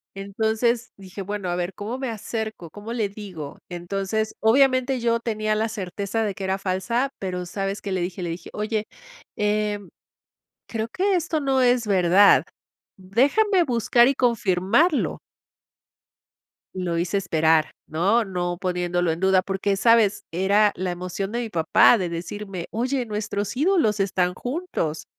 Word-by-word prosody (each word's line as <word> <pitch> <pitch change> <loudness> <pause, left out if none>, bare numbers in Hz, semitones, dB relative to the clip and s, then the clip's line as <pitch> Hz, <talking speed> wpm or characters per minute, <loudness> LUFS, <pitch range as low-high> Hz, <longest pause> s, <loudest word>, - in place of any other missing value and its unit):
Entonces 220 +4 -1
dije: 195 0 -9
"Bueno, 200 -1 -4
a 175 - -1
ver, 180 +1 -3
¿cómo 215 +6 -5
me 265 -2 -3
acerco? 220 -4 -5
¿Cómo 210 +7 -8
le 220 -4 -1
digo?". 190 -8 -8
Entonces, 195 +5 -3
obviamente, 255 +2 +3
yo 235 0 +1
tenía 215 -2 -1
la 220 +1 0
certeza 200 +1 -3
de 205 -2 -1
que 195 - -8
era 190 0 0
falsa 195 +8 -1
pero, 180 -2 -4
¿sabes 195 +2 -3
qué? 200 - -5
Le 185 -1 -1
dije 180 +1 -4
le 175 - -3
dije: 170 - -8
"Oye, 215 0 -2 0.5
em, 210 -1 -1 0.8
creo 225 -1 -3
que 380 - 0
esto 330 -2 0
no 270 -2 +1
es 245 -1 +3
verdad, 190 0 +5 0.5
déjame 285 - +2
buscar 240 -3 +3
y 275 - +2
confirmarlo". 230 - +2 1.6
Lo 180 -2 -2
hice 175 +4 0
esperar, 160 -4 +2 0.2
¿no? 195 +9 +2
No, 175 -2 -3
poniéndolo 180 -2 0
en 160 - -4
duda 190 0 +4
porque, 195 +1 -1
¿sabes? 220 -1 +4
Era 200 +4 +3
la 185 0 -2
emoción 180 +3 -4
de 235 - -2
mi 235 -2 -3
papá 170 +5 +5
de 185 -4 -2
decirme: 180 +2 -6
"Oye, 250 +3 -1
nuestros 210 0 -3
ídolos 295 - +2
están 185 -2 +1
juntos". 245 - -3
205 Hz, 150 wpm, -24 LUFS, 185-230 Hz, 1.6 s, verdad